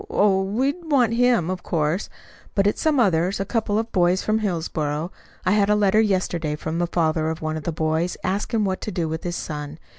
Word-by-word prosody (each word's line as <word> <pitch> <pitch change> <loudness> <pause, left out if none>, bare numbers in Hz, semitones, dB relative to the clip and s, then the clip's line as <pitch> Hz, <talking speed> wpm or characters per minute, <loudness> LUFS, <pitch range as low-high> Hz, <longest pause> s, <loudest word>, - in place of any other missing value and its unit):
Oh, 195 -2 +3
we'd 270 - -1
want 245 -5 +4
him, 235 -7 +3
of 185 -1 -4
course; 160 +3 -1 0.5
but 195 - +3
it's 205 - +1
some 310 -3 +2
others 185 -3 +2
a 195 - -1
couple 215 -1 0
of 225 +1 -2
boys 180 +1 +2
from 215 +1 +1
Hillsboro. 160 -4 -2 0.3
I 185 - +3
had 205 0 +3
a 210 - +4
letter 210 +1 +4
yesterday 180 -7 0
from 160 +2 -4
the 175 - +1
father 160 -2 +1
of 160 0 -5
one 155 0 -1
of 155 - -6
the 170 - 0
boys, 160 +2 -1
asking 205 +3 0
what 190 -2 -1
to 215 - -4
do 170 -5 -1
with 160 +1 -4
his 175 -1 -3
son. 150 -2 -5
185 Hz, 215 wpm, -23 LUFS, 160-210 Hz, 0.5 s, want